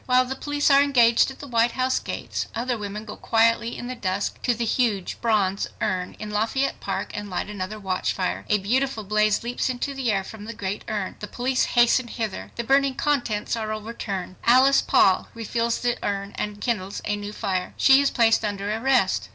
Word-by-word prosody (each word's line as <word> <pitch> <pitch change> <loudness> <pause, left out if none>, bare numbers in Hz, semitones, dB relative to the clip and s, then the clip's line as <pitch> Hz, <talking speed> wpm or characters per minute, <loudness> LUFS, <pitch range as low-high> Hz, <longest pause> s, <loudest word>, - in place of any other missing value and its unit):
While 255 0 +4
the 265 +1 -4
police 290 +1 0
are 275 0 +7
engaged 240 -5 +4
at 265 - -9
the 285 - -9
White 235 -1 +2
House 255 0 +1
gates, - - -4
other 245 +2 -1
women 210 0 -6
go 210 - -7
quietly 230 +1 +2
in - - -6
the 250 - -4
dusk 200 -4 -3
to 245 - +1
the 235 +1 -2
huge 220 -5 0
bronze 205 -4 +1
urn 185 -2 -2
in 210 0 -7
Lafayette 225 +6 0
Park - - -3
and 205 -1 -5
light 185 +2 -3
another 205 +1 -5
watchfire. 185 -1 -2
A 210 - +4
beautiful 240 +3 0
blaze 210 +1 +1
leaps 240 +2 -1
into 255 +2 -3
the 265 -4 -1
air 195 -2 0
from 210 +1 -10
the 230 +1 -7
great 200 -1 -4
urn. 205 -3 -3
The 210 - -6
police 255 +3 0
hasten 240 +1 +4
hither. 220 -4 -5
The 235 - -3
burning 270 +2 +3
contents 250 -7 0
are 220 -1 -3
overturned. 210 -4 -5
Alice 260 +3 +5
Paul 190 -1 +3
refills 230 +1 -1
the 240 -1 -1
urn 200 0 -2
and 210 -1 -4
kindles 205 -4 -3
a 210 - 0
new 205 0 -6
fire. 185 -3 -3
She 270 0 +6
is 280 - +2
placed 225 -1 +3
under 205 0 -2
arrest. 220 - +1
225 Hz, 200 wpm, -24 LUFS, 205-250 Hz, -, are